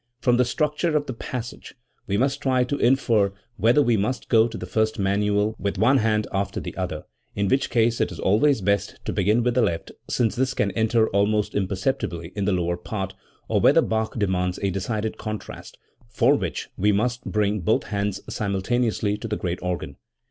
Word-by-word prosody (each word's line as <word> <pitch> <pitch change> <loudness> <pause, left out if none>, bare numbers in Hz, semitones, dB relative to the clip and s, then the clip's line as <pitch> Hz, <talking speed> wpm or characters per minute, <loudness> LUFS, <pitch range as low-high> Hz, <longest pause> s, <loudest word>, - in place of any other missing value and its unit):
From 120 0 +3
the 125 - +4
structure 150 +4 0
of 145 - -2
the 130 - -4
passage 120 +2 -7 0.3
we 100 - 0
must 135 +4 0
try 130 -2 +2
to 140 +3 -2
infer 115 -6 +3 0.2
whether 120 +7 +4
we 120 -4 +2
must 125 +6 -2
go 115 -1 +5
to 115 - -7
the - - -6
first 110 0 0
manual 105 +2 +1
with 100 0 -2
one 130 +7 +4
hand 110 -1 +1
after 100 0 -2
the - - -7
other, - - -4 0.3
in 100 0 0
which 135 +5 +1
case 115 -1 +2
it - - 0
is - - -8
always 110 +5 +3
best 100 +1 0
to - - -2
begin 105 +4 +2
with 125 0 +1
the 125 - +3
left, 85 -7 -1 0.2
since 120 -2 +1
this 130 +1 0
can 100 - +1
enter 110 +1 +2
almost 100 +1 +1
imperceptibly 95 -3 -2
in 100 -2 -1
the 105 - +2
lower 85 -1 0
part 95 +1 -4 0.3
or - - +1
whether - - +5
Bach 110 +1 -2
demands 90 -3 0
a 100 - +1
decided 105 +3 -3
contrast, 110 -1 -7 0.3
for 120 +3 +3
which 95 - -2
we 105 +2 +2
must 120 +4 0
bring 105 0 0
both 95 +5 +1
hands 100 -1 -2
simultaneously 105 +1 -1
to 115 - -5
the 105 - -2
great 90 -1 -3
organ. 90 -1 -4
110 Hz, 195 wpm, -24 LUFS, 100-120 Hz, 0.3 s, go